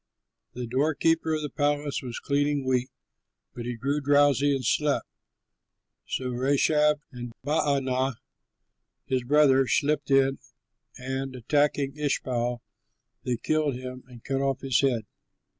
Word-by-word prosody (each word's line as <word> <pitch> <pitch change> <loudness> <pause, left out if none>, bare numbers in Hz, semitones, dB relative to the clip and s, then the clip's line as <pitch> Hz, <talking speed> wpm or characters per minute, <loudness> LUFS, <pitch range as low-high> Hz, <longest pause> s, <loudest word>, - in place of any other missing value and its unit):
The 125 0 -5
doorkeeper 155 +5 +1
of 155 - -3
the 150 - -3
palace 145 -1 0
was 125 -2 -6
cleaning 145 -1 0
wheat, 130 0 +1 0.6
but 120 - -7
he 125 - -3
grew 140 +5 -1
drowsy 145 0 +4
and 130 -2 -4
slept. 150 +3 +1 1.0
So 130 -1 -2
Rechab 145 +4 +2
and 120 -1 -8
Baanah 135 -4 +1 0.9
his 130 -1 -1
brother 135 -1 +4
slipped 145 0 +1
in 135 0 +3 0.6
and, 130 +1 -4
attacking 145 +2 0
Ishbaal, 125 -4 -1 0.6
they 125 -2 0
killed 155 +1 0
him 130 0 -7
and 120 -3 -14
cut 135 0 -1
off 135 -1 -1
his 135 -3 +2
head. 125 -5 +1
135 Hz, 125 wpm, -27 LUFS, 125-145 Hz, 1.0 s, drowsy